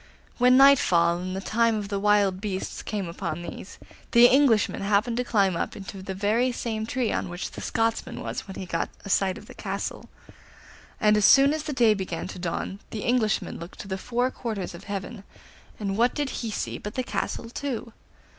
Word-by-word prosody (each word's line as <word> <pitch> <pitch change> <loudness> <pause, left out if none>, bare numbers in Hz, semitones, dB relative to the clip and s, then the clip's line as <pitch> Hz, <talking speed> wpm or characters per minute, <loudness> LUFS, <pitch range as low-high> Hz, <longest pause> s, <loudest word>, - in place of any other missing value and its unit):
When 250 +1 +6
nightfall 175 -12 +5
and 185 +1 -4
the 190 - -3
time 230 +2 +2
of 205 -2 -4
the 200 -1 -1
wild 200 -2 +3
beasts 195 -3 -4
came 205 -4 -3
upon 170 -1 -4
these, 185 - -8 0.4
the 235 +1 +8
Englishman 245 -4 +4
happened 205 +4 +1
to 250 - +1
climb 200 -6 +2
up - - -3
into 195 -1 -8
the 190 0 -5
very 220 +6 +1
same 220 -2 -3
tree 245 -2 -1
on - - -2
which 175 +1 -5
the - - -8
Scotsman 225 0 -1
was - - -5
when 190 - -8
he 190 - -5
got 165 -1 -2 0.2
a 200 - -3
sight 190 -1 +2
of - - -12
the - - -12
castle; - - -5 0.9
and 210 0 +4
as 210 - +4
soon 275 +1 +7
as 310 - -2
the 300 - -4
day 235 -5 +4
began 190 -3 -4
to - - -8
dawn 175 -2 -2
and 195 - -10
the 215 - -5
Englishman 235 -4 0
looked 170 +3 -10
to - - -10
the 190 - -2
four 250 +4 0
quarters 215 -9 -4
of 170 +3 -11
heaven, 200 +1 -5 0.5
what 215 +4 +1
did 290 -2 -1
he 230 - -4
see 210 - -3
but 210 - -7
the 255 - 0
castle 235 - -3
too! 245 -4 -4
210 Hz, 205 wpm, -26 LUFS, 190-240 Hz, 0.9 s, the